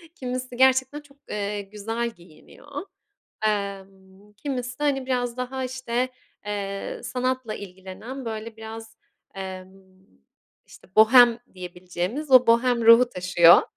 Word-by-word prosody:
kimisi 255 -1 -5
gerçekten 265 +2 +3
çok, 285 -1 -22
eee, 205 0 -3
güzel 220 +4 -4
giyiniyor. 230 - -11 0.6
Emm, 195 -1 -5
kimisi 250 -1 -4
de - - -2
hani 270 -3 +1
biraz 245 -1 -1
daha 260 +1 -3
işte, 255 -1 -2 0.4
eee, 200 -1 -4
sanatla 255 -3 -2
ilgilenen 200 +7 -9
böyle 225 0 -6
biraz, 225 0 -9 0.4
emm, 190 -1 -7 0.9
işte - - -17
bohem 235 +1 +7
diyebileceğimiz 180 - -5
o 255 -1 +7
bohem 235 0 +3
ruhu 235 +2 +8
taşıyor. 180 -3 +6
230 Hz, 115 wpm, -25 LUFS, 195-255 Hz, 0.9 s, ruhu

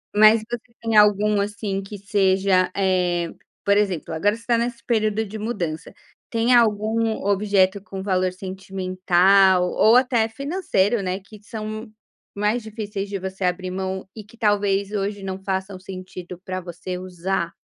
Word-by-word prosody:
Mas 215 +1 +7
você 240 0 -6
tem 225 -1 -1
algum, 210 0 +5
assim, 200 -1 -3
que 205 +1 -8
seja 190 -2 +2
eh, 180 -3 +1 0.4
por 200 - +4
exemplo, 190 -6 -1
agora 205 +7 +1
você 230 - -13
está 235 0 +1
nesse 235 0 -2
período 220 -2 +1
de 220 +1 -7
mudança, 180 -8 -4 0.4
tem 230 +2 +2
algum 225 0 +2
objeto 200 -1 +2
com 195 -1 -7
valor 185 -2 +1
sentimental 185 0 +2
ou 220 +2 +5
até 240 -3 +2
financeiro, 240 - 0
né, 185 +1 -2
que 205 +1 -15
são 215 +1 -6 0.4
mais 210 +3 0
difíceis 210 -2 -5
de 200 -1 -3
você 190 0 -5
abrir 180 +1 -1
mão 190 0 -4
e 215 - -8
que 210 +3 -19
talvez 200 -2 +1
hoje 205 0 -2
não 190 0 -5
façam 190 0 -3
sentido 185 -1 -9
para 185 0 -3
você 175 +1 -6
usar? 180 -1 -3
200 Hz, 155 wpm, -23 LUFS, 185-215 Hz, 0.4 s, Mas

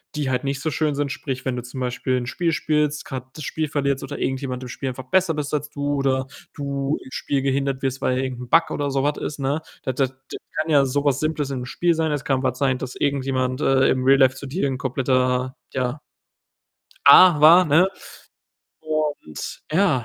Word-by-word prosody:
die 145 -3 -1
halt 130 +2 -1
nicht 135 0 -2
so 155 - -1
schön 155 -1 0
sind. 145 -1 -1
Sprich, 135 -2 -5
wenn 130 -1 -1
du 120 - -5
zum 125 +2 -8
Beispiel 125 +1 -1
'n 120 -1 -3
Spiel 170 +4 -1
spielst, 150 0 0
grad 130 -1 -6
das 155 - -7
Spiel 155 -1 -2
verlierst 140 -2 -1
oder 145 - -6
irgendjemand 130 -1 -2
im - - -6
Spiel 135 +2 -4
einfach 130 0 -8
besser 185 -3 +3
bist 150 -1 -4
als 150 0 -1
du 145 0 -2
oder 135 -1 0 0.3
du 140 0 -2
im 130 - -13
Spiel 140 -1 -1
gehindert 135 0 -1
wirst, 135 -1 -2
weil 130 0 +1
irgend 130 -2 -3
'n 125 - -9
Bug 165 -1 +4
oder 145 -1 -2
so 135 0 0
was 145 0 0
ist, 150 - -5
ne? 140 +4 -1 0.2
Das 130 - -2
das 135 -2 +1
das 130 0 -11 0.2
kann 155 - -5
ja 140 -3 +5
so 140 +2 -1
was 140 -1 +2
Simples 155 -2 -1
in 130 - -3
'nem 125 - -5
Spiel 170 +6 +1
sein. 160 -1 0
Es 145 0 -3
kann 135 -3 0
was 130 -1 0
sein, 130 -2 +2
dass 130 -1 -6
irgendjemand, 130 -2 -1
äh, 135 0 +3
im 130 - +1
Real 135 +1 +5
Life 130 -1 +5
zu 140 - -8
dir 140 +1 -1
'n 130 -1 -2
kompletter, 130 0 0 0.2
ja, 130 +2 -2 1.1
Ar 175 -5 +8
war, 170 +4 +8
ne, 165 +5 +4 0.9
und 155 - -3
ja, 160 - +2
135 Hz, 220 wpm, -22 LUFS, 130-150 Hz, 1.1 s, Ar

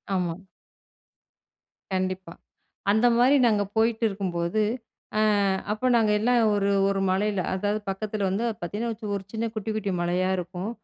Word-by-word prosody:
ஆமா. 175 -2 -1 1.5
கண்டிப்பா, 185 -2 -2 0.6
அந்த 220 +4 +4
மாரி 260 +4 +5
நாங்க 210 -3 +2
போயிட்டுருக்கும்போது. 210 -4 0 0.6
அ - - +3 0.5
அப்ப 215 +4 -2
நாங்க 220 -2 +3
எல்லாம் 240 +3 +3 0.2
ஒரு, 200 -1 +1 0.2
1 195 0 0
மலையில 200 0 +1
அதாவது 205 +3 -1
பக்கத்தில 205 +1 -2
வந்து 200 +5 -1 0.2
பார்த்தீங்கனா 210 +7 -3
வச் 210 -2 -4
ஒரு 195 - -6
சின்ன 225 0 -2
குட்டி 215 0 -3
குட்டி 205 -2 -2
மலையா 180 +2 +1
இருக்கும். 180 +3 -4
205 Hz, 135 wpm, -26 LUFS, 185-220 Hz, 1.5 s, மாரி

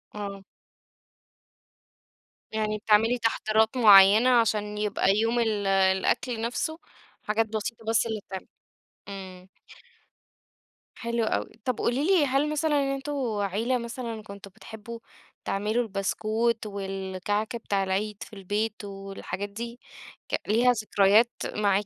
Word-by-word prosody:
آه. 200 -1 -6 2.1
يعني 215 -1 -1
بتعملي 220 +3 +3
تحضيرات 220 0 +1
معيّنة 210 +1 +8
عشان 210 -4 +2
يبقى 205 -2 +1
يوم 230 +2 +1
ال 215 -3 0
الأكل 195 +5 +1
نَفسه 245 +7 -2 0.4
حاجات 220 +1 +1
بسيطة 225 +1 -4
بس 225 +1 +2
اللي 220 -2 -3
تتعمل، 190 -1 -7 0.6
إمم. 190 -2 -9 1.5
حلو 235 -1 -2
أوي، 220 - -1 0.2
طَب 255 -2 -1
قولي 255 +5 0
لي 365 -4 +4
هل 275 +2 +1
مثلًا 295 -3 +1
أنتم 275 +2 -5 0.3
عيلة 215 +6 0
مثلًا 235 -2 -6
كنتم 200 -1 -11
بتحبوا 220 +2 -9 0.5
تعملوا 210 +5 0
البسكويت 220 +3 -1
والكعك 195 +1 -3
بتاع 200 -4 -1
العيد 200 +2 -2
في - - -15
البيت 205 +2 -3
والحاجات 195 0 -6
دي 235 +4 -7 0.7
ليها 240 +4 +4
ك - - -8
ذكريات 210 +3 +4 0.3
معاكِ؟ 205 -1 +2
215 Hz, 115 wpm, -27 LUFS, 200-235 Hz, 2.1 s, معيّنة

